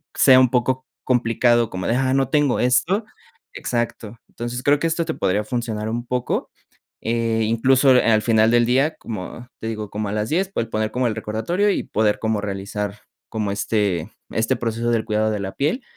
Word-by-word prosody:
sea 130 -2 +7
un 130 -2 +5
poco 130 +1 0 0.2
complicado 120 -1 +2
como 95 0 -4
de, 115 - +1
ah, 130 0 +1
no 135 -1 +2
tengo 145 -3 +2
esto. 150 - +2 0.5
Exacto. 115 -2 -3
Entonces, 120 +1 -5
creo 145 +1 +3
que 165 - +1
esto 165 0 -1
te 160 - -2
podría 100 +3 0
funcionar 115 -4 -3
un 120 +2 -3
poco. 125 0 -2 0.5
Eh, 115 -1 0
incluso, 130 +3 +4
eh, - - +5
al 110 0 +4
final 110 -1 +4
del 120 0 +4
día, 135 +6 +2
como 110 +3 -7
te 110 - -5
digo, 110 -2 -4
como 105 -1 -3
a - - -3
las 105 +1 -2
10, 190 +4 0
pues, 115 - -1
el 115 - -18
poner 110 0 -1
como 125 +1 0
el 110 - -2
recordatorio 115 - -1
y - - 0
poder 105 -1 0
como 110 -2 -1
realizar, 100 +1 -4 0.3
como 105 -3 -2
este 100 -4 -1 0.2
este 110 0 +1
proceso 115 0 -1
del 115 -2 +1
cuidado 110 0 +1
de 105 - -2
la 95 -1 -4
piel, 155 - -1
115 Hz, 200 wpm, -21 LUFS, 110-130 Hz, 0.5 s, sea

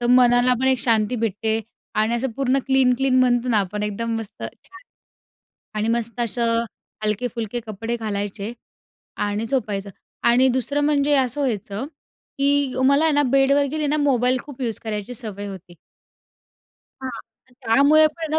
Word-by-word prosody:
तर 240 - -1
मनालापण 250 0 +4
एक 260 -2 +3
शांती 225 0 +2
भेटते 220 0 -1 0.3
आणि 220 +2 +1
असं 260 +2 -2
पूर्ण 270 -1 +2
क्लीन-क्लीन 265 -1 +3
म्हणतो 245 0 +2
ना, 225 - +3
आपण 205 +2 -4
एकदम 225 +2 -2
मस्त 220 -2 -9
छान 380 +2 -10 1.0
आणि 215 - 0
मस्त 235 0 0
असं 230 0 +1 0.4
हलकेफुलके 230 +1 -2
कपडे 225 +3 -4
घालायचे 205 -1 -4 0.6
आणि 205 +2 -2
झोपायचं. 210 -6 -2 0.3
आणि 250 +2 +4
दुसरं 260 +3 0
म्हणजे 290 -1 +2
असं 260 +1 +1
व्हायचं, 215 -3 -2 0.5
की 280 -2 +2
मला 280 +4 +4
आहे 315 - +3
ना 290 - +4
बेडवर 275 +1 +4
गेली 305 -1 -1
ना, 295 +1 +1
मोबाईल 255 -3 +2
खूप 280 -3 -12
यूज 230 -3 -1
करायची 210 +2 -4
सवय 205 -3 -5
होती. 185 -3 -10 1.3
हां. 260 -1 -4 0.4
तर 260 - -26
त्यामुळे 285 +7 +5
पण. 315 -1 -1
240 Hz, 145 wpm, -22 LUFS, 220-270 Hz, 1.3 s, त्यामुळे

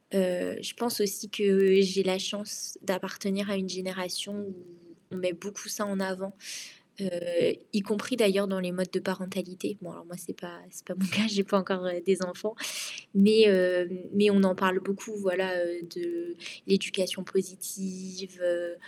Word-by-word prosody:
Heu, 180 - +1
je - - -5
pense 235 -2 -1
aussi 205 +1 -1
que 195 -1 +5
j'ai 195 0 +3
la 185 0 +2
chance 205 - -4
d'appartenir 195 +1 -2
à - - 0
une 190 -1 -3
génération 185 +1 -4
où 195 -2 -8 0.6
on 185 - -6
met 180 -1 -1
beaucoup 200 +3 -9
ça 210 0 -2
en 200 -1 -2
avant, 190 +1 -4 0.7
heu, 195 - -2 0.7
y 210 - +2
compris 215 +4 -2
d'ailleurs 200 -3 +4
dans 190 - -1
les 180 -1 -2
modes 185 0 -2
de 185 - +1
parentalité. 185 +1 -5
Bon, 175 -2 -10
alors - - -15
moi, 175 +1 -11
c'est 175 - -9
pas 175 -2 -11
c'est - - -13
pas 185 - -6
mon 190 +1 +1
cas, 205 +4 +2
j'ai 200 -2 +1
pas 200 - +2
encore, 185 -1 -1
heu, 175 -1 -2
des 190 -1 +3
enfants 185 +4 -4 0.6
mais 215 +3 +8
hem, 180 -3 +6 0.2
mais 205 +1 +6
on 200 - +7
en 185 -1 +4
parle 190 0 +3
beaucoup, 195 +3 -5
voilà, 185 -1 0
heu, 175 0 -4
de 345 0 -4 0.3
l'éducation 190 -1 +1
positive, 185 0 -5
heu, 175 0 0
190 Hz, 180 wpm, -29 LUFS, 185-200 Hz, 0.7 s, mais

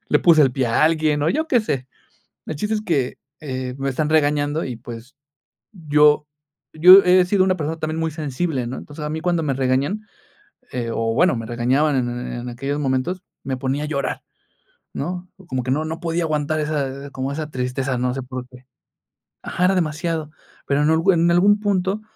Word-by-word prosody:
le - - +4
puse 160 -3 +6
el 130 -3 +3
pie 130 -2 0
a 115 - +2
alguien 155 -2 +2
o 155 - +2
yo 315 +2 0
qué 245 -6 +3
sé, 135 -11 -3 0.6
el 155 - -4
chiste 210 +6 -1
es 210 - -2
que, 140 -10 -1 0.2
eh, 130 -3 -4
me 135 - -2
están 150 +3 -1
regañando 150 0 +1
y, 125 - -5
pues, 120 +2 -10 0.6
yo 150 -3 +3 0.5
yo 185 +4 +10
he 180 0 +5
sido 185 +1 +3
una 185 -1 +1
persona 160 +1 -3
también 155 +1 -3
muy 160 -1 -1
sensible, 145 -3 -2
¿no?, 130 - -5
entonces 150 +1 -9
a 150 - -3
mí 160 +1 -3
cuando 175 -2 +1
me 140 -2 0
regañan, 135 +10 0 0.7
eh, 120 -2 -3
o 115 0 -1
bueno, 175 +5 +3
me 115 -1 -4
regañaban 130 +6 +1
en 120 -1 0 0.2
en 120 0 -5
aquellos 135 +4 -3
momentos, 140 +7 -1 0.2
me 130 -1 -3
ponía 135 +3 -2
a - - -5
llorar, 140 -2 -3 0.7
¿no?, 180 +4 -4 0.2
como 130 -5 -2
que 130 - -2
no 155 +3 0
no 160 +1 -4
podía 170 0 -1
aguantar 155 0 -1
esa, 140 -2 -3
como 135 +1 -3
esa 155 +1 -4
tristeza, 130 0 -2
no 125 0 0
sé 135 - -4
por 130 -1 -7
qué. 125 0 -16 0.8
Ajá, 180 - -1
era 190 - +3
demasiado, 160 -2 -1 0.4
pero 145 +1 +2
en 150 - +3 0.3
en 170 0 +4
algún 200 +4 +4
punto, 200 0 0
150 Hz, 195 wpm, -21 LUFS, 130-165 Hz, 0.8 s, yo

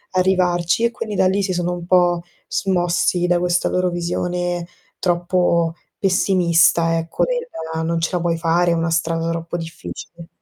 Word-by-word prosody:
arrivarci, 180 +1 +2
e 235 - +1
quindi 220 -3 -5
da 185 - +3
lì 195 +2 +1
si 185 -1 -1
sono 175 0 -1
un 175 -1 -6
po' 175 -1 +3 0.3
smossi 175 -1 +1
da 175 0 +2
questa 175 0 +1
loro 180 0 +1
visione 175 0 -2 0.3
troppo 175 -2 +1 0.3
pessimista, 170 -3 +3
ecco, 165 0 -1
del - - -2 0.4
non 165 0 0
ce 165 - -1
la 175 - 0
puoi 170 -1 0
fare, 170 +1 +2
è - - +3
una 165 0 -1
strada 165 0 0
troppo 165 +1 -4
difficile. 165 0 -9
175 Hz, 160 wpm, -20 LUFS, 170-180 Hz, 0.4 s, da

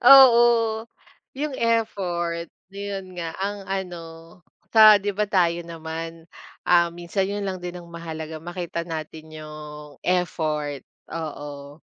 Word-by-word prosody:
Oo, 255 -3 +10 0.9
yung 285 +1 -2
effort. 180 -7 0 0.3
Yun 195 -2 -6
nga 165 -1 -4
ang 200 0 -3
ano 185 -3 -3 0.7
sa 215 -1 +10
Di 205 - 0
ba 210 +1 0
Tayo 175 -3 +3
naman, 165 0 -6 0.4
ah, 170 -1 +5
minsan 175 +3 -2
yun 205 0 -2
lang 185 -2 -3
din 180 0 -5
ang 170 -1 -10
mahalaga 160 -1 -6
makita 170 0 -4
natin 160 0 -6 0.2
yung 150 -1 -10
effort. 155 -5 0 0.3
Oo. 145 -2 -6
175 Hz, 120 wpm, -24 LUFS, 160-195 Hz, 0.9 s, Oo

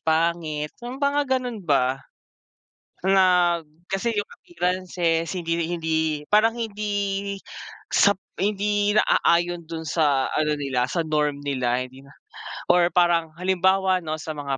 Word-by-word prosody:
pangit 160 -2 0
yung 245 +2 -6
mga 285 +1 +1
ganun 245 -4 -4
ba. 135 -6 +1 1.1
Nag 180 -4 +3 0.2
kasi 195 +5 -1
yung 205 - 0
appearances 175 -1 -2
hindi 170 -1 -1
hindi 160 -3 -1
parang 220 +5 +3
hindi 200 -3 -2 0.6
sap 200 -1 +4 0.2
hindi 205 +1 +1
naaayon 175 -4 +2
dun 160 -1 -5
sa 145 -4 +2
ano 150 -1 +1
nila 130 -3 -1
sa 165 +4 -1
norm 150 -2 0
nila. 125 -2 0
hindi 130 +1 -14
na 140 - -18 0.6
or 175 -1 +4
parang 175 -2 +2
halimbawa 190 +1 +2
ano 155 -1 -4
sa 155 0 -6
mga 140 -2 -3
170 Hz, 130 wpm, -24 LUFS, 155-195 Hz, 1.1 s, sap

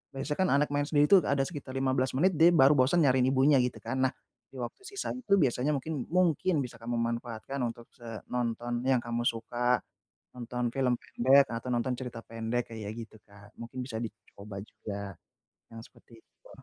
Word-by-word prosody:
biasanya 145 +2 -3
kan 185 - +3
anak 145 +1 +2
main 145 0 0
sendiri 145 -2 +4
itu 195 - +9
ada 140 -1 +2
sekitar 140 -3 -7
15 130 -1 +1
menit, 175 +3 +2
dia 170 +2 +7
baru 135 -1 +7
bosan 145 +6 +4
nyariin 130 -1 +4
ibunya 135 +1 +4
gitu, 125 0 -1
kan. 130 - -3
Nah - - -6 0.3
di - - -20
waktu 120 - -5
sisanya 395 -10 -4
itu, 200 - +4
biasanya 135 0 +1
mungkin 145 -1 -4
mungkin 180 0 +2
bisa 120 - -9
kamu 120 +1 -3
manfaatkan 115 +3 -3
untuk, 115 0 -8
se 115 -4 -9
nonton 120 0 -2
yang 130 -2 +4
kamu 120 0 -2
suka, 120 +2 0 0.6
nonton 125 0 -3
film 125 -2 +2
pendek 135 +3 +4
atau 115 +2 -4
nonton 120 +2 0
cerita 125 -2 -6
pendek, 115 +1 -3
kayak 105 -2 -5
gitu, 110 -1 -9
Kak, 100 +1 -17
mungkin 115 +2 -7
bisa 120 -4 -7
dicoba 105 -2 -9
juga 100 -3 -7 0.6
yang 115 - -8
seperti 115 -2 -19
itu. - - -23
125 Hz, 185 wpm, -29 LUFS, 115-140 Hz, 0.6 s, itu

